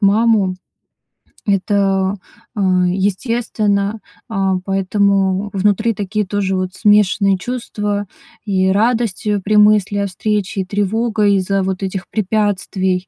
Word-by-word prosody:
маму, 205 -2 +3 0.9
это, 195 -1 +1 0.4
а, 205 - -2 0.3
естественно, 205 +1 -1 0.3
а. 195 -4 0
Поэтому 195 0 +1
внутри 210 +4 +1
такие 210 +1 -2
тоже 195 0 -1
вот 185 0 -2
смешанные 200 -2 +3
чувства 210 -3 -3 0.4
и 190 -2 +1
радость, 220 +1 0
э, 205 -1 +1
при 215 +1 0
мысли 210 -1 +4
о 200 - 0
встрече, 200 0 -2
и - - -4
тревога 210 +2 0
из-за 195 0 +1
вот 190 +1 -3
этих 190 -1 -4
препятствий, 190 -3 -1
200 Hz, 115 wpm, -17 LUFS, 190-210 Hz, 0.9 s, мысли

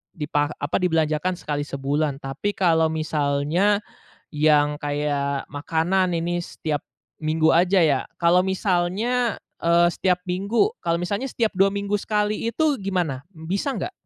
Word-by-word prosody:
dipa 145 -2 0
apa, 145 - -1
dibelanjakan 165 0 +1
sekali 145 -3 -4
sebulan, 140 +1 -1
tapi 140 +10 -3
kalau 165 -4 +3
misalnya 155 +6 +1 0.5
yang 150 -1 +3
kayak 145 -1 -2
makanan 165 +5 0
ini 175 +1 -1
setiap 150 -4 -4 0.3
minggu 160 0 +1
aja 180 +3 +4
ya. 145 -5 +3 0.2
Kalau 175 +2 +4
misalnya, 195 +6 0 0.2
eee, 170 +1 +5
setiap 180 +1 0
minggu, 200 - +1
kalau 170 0 +1
misalnya 200 +8 -2
setiap 225 -2 +1
2 195 +1 +4
minggu 200 0 -1
sekali 210 +1 -1
itu 310 +2 +1
gimana, 175 -9 -1
bisa 185 - -3
nggak? 355 - -4
170 Hz, 130 wpm, -23 LUFS, 150-195 Hz, 0.5 s, eee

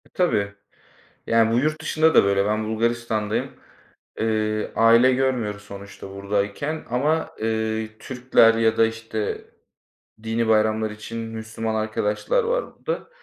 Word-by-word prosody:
Tabii. 100 - +1 0.7
Yani 115 0 +3
bu 115 - +3
yurt 155 +3 0
dışında 160 0 +2
da - - +7
böyle. 100 0 +2
Ben 110 +1 0
Bulgaristan'dayım. 110 -1 -1 0.7
Iıı, 110 -1 -1
aile 115 +3 +5
görmüyoruz 125 -6 -1
sonuçta 100 -1 -10
buradayken 100 +10 -2
ama, 150 +7 0
eee, 110 0 -2
Türkler 125 -3 +3
ya 110 -1 +2
da 115 - +6
işte 115 -1 -4 0.8
dini 115 +1 -1
bayramlar 110 0 +2
için 110 +2 -8
Müslüman 110 0 -4
arkadaşlar 110 - 0
var - - 0
burada. 480 0 -5
110 Hz, 120 wpm, -23 LUFS, 110-120 Hz, 0.8 s, da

